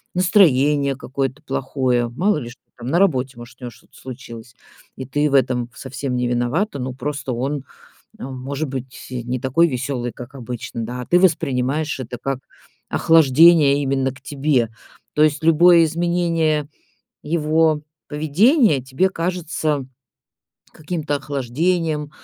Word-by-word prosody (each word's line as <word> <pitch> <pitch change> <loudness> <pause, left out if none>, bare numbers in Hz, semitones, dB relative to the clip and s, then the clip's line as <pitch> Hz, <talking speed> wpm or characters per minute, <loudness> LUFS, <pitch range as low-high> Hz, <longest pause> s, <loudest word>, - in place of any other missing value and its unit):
настроение 150 -7 +3
какое-то 135 +1 -4
плохое, 125 -4 -1
мало 175 - +1
ли 120 -5 -6
что 125 - -14 0.2
там, 120 - -7
на 170 +4 +2
работе, 130 -9 +1
может, 120 +2 -12
у - - -13
него 120 - -5
что-то - - -22
случилось, 120 -2 -10 0.4
и 130 - -6
ты 145 +3 0
в - - -3
этом 125 -2 +2
совсем 130 -1 -5
не 125 0 0
виновата. 125 - -1
Ну, 130 0 -4
просто 135 0 -4
он, 135 +3 -2 0.6
эм, 130 +1 -7
может 140 +3 -4
быть, 130 -1 -7
э, 125 -1 -4
не 125 +2 -3
такой 165 +6 +3
веселый, 125 -2 -3
как 125 +2 -11
обычно, 120 -2 -6
да, 125 +1 -5
а - - -9
ты 175 - +4
воспринимаешь 145 -4 +1
это 125 -1 -6
как 135 0 -3 0.5
охлаждение 155 -1 +5
именно 135 -1 0
к 130 - -16
тебе. 140 -4 0 0.4
То 150 - +3
есть 155 0 +2
любое 165 +1 +6
изменение 165 -2 0 0.5
его 155 0 +1 0.3
поведения 155 - +3
тебе 130 +9 0
кажется 165 -5 -2 0.9
каким-то 155 -2 -3
охлаждением, 150 +3 -1
140 Hz, 145 wpm, -20 LUFS, 130-160 Hz, 0.9 s, любое